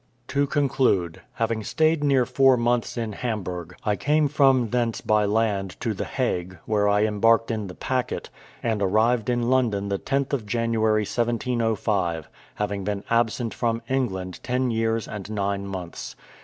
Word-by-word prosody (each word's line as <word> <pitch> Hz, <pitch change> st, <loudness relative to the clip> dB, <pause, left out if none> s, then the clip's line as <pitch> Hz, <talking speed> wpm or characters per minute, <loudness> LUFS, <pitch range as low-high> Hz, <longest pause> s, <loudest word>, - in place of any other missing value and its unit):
To 140 Hz, 0 st, +1 dB
conclude: 130 Hz, -, +1 dB
having 115 Hz, -1 st, -1 dB
stayed 155 Hz, +4 st, +2 dB
near 135 Hz, -3 st, +3 dB
four 130 Hz, +1 st, +4 dB
months 120 Hz, +1 st, 0 dB
in 115 Hz, -2 st, -2 dB
Hamburgh, 90 Hz, -7 st, -4 dB
I 105 Hz, -, +2 dB
came 150 Hz, +5 st, +2 dB
from 135 Hz, -5 st, +3 dB
thence 120 Hz, -2 st, 0 dB
by 105 Hz, -1 st, +2 dB
land 100 Hz, -3 st, 0 dB
to 115 Hz, -, -1 dB
the 95 Hz, -, -4 dB
Hague, 90 Hz, -8 st, -2 dB
where 105 Hz, -1 st, +2 dB
I 105 Hz, +1 st, +3 dB
embarked 115 Hz, +2 st, +3 dB
in 110 Hz, -3 st, -3 dB
the 90 Hz, -, -9 dB
packet, 130 Hz, -1 st, -2 dB, 0.3 s
and 110 Hz, -3 st, 0 dB
arrived 110 Hz, +4 st, +2 dB
in 120 Hz, 0 st, +1 dB
London 110 Hz, -6 st, +1 dB
the 100 Hz, -1 st, -1 dB
10th 140 Hz, 0 st, -1 dB
of 120 Hz, -7 st, -1 dB
January 110 Hz, -1 st, +1 dB
1705, 110 Hz, -, -1 dB, 0.3 s
having 100 Hz, -1 st, -2 dB
been 100 Hz, 0 st, -3 dB
absent 115 Hz, 0 st, +1 dB
from 115 Hz, -1 st, -1 dB
England 95 Hz, -9 st, -2 dB
ten 125 Hz, 0 st, 0 dB
years 115 Hz, 0 st, 0 dB
and 105 Hz, -1 st, -7 dB
nine 100 Hz, -1 st, -2 dB
months. 90 Hz, -3 st, -6 dB
115 Hz, 155 wpm, -24 LUFS, 100-125 Hz, 0.3 s, four